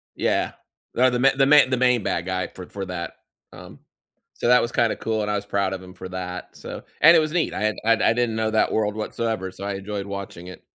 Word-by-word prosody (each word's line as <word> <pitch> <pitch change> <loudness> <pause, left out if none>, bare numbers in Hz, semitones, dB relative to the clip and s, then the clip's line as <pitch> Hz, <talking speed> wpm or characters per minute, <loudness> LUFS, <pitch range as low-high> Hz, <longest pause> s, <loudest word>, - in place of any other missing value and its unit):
yeah. - - 0 0.4
No, 130 +1 +5
the 125 0 -1
ma 135 +2 +6
the 135 0 +4
main 145 -2 +6
the 130 - +1
main 125 -4 +3
bad 85 - -1
guy 95 -1 -2
for 90 -1 -11
for 100 -1 -5
that. 90 -2 -5 0.4
Um, - - -12 0.5
so - - -3
that 125 0 +6
was 120 - -2
kinda 115 -2 +1
cool, 110 -1 -2
and 105 0 -1
I - - 0
was 100 - -3
proud 100 -1 -1
of 95 - -5
him 90 0 -12
for 95 -1 -9
that, 90 -1 -6
so - - -8 0.2
and 165 +3 +8
it - - +7
was 155 -1 -1
neat, 170 -3 0
I - - -4
had 110 0 +1
I 115 - +5 0.2
I - - +2
didn't 120 -2 0
know 110 0 0
that 110 - +2
world 105 -1 0
whatsoever, 110 -3 -3
so 100 - -10
I 100 - -2
enjoyed 100 0 -5
watching 100 -3 -7
it. 90 - -11
105 Hz, 255 wpm, -23 LUFS, 95-120 Hz, 0.5 s, and